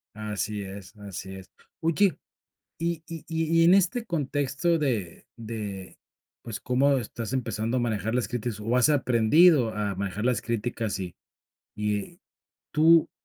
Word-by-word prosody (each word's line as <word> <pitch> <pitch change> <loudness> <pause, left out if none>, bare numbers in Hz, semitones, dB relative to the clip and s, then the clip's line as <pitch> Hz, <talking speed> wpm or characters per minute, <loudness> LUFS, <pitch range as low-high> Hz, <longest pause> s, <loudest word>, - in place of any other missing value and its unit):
Así 105 0 -3
es, 95 +1 -9
así 95 -1 -7
es. 95 -1 -11 0.3
Oye, 170 +4 +3 0.6
y 170 -1 -2
y 165 -2 -8
y 165 0 +1
y - - +6
en 170 - +7
este 195 +5 +2
contexto 150 - 0
de 115 - -2
de, 105 -5 -6 0.5
pues, 115 -3 -5
cómo 135 +2 +2
estás 115 0 -5
empezando 115 -2 -1
a - - +2
manejar 110 -2 -1
las 125 - 0
críticas 120 -2 -3
o 115 +4 0
has 125 +3 +5
aprendido 135 0 +4
a 105 -2 -1
manejar 100 +3 -3
las 125 -1 +1
críticas, 115 -2 -2
y 90 -3 -5 0.6
y 105 - -2 0.5
¿tú 165 +1 +5
120 Hz, 145 wpm, -27 LUFS, 105-155 Hz, 0.6 s, en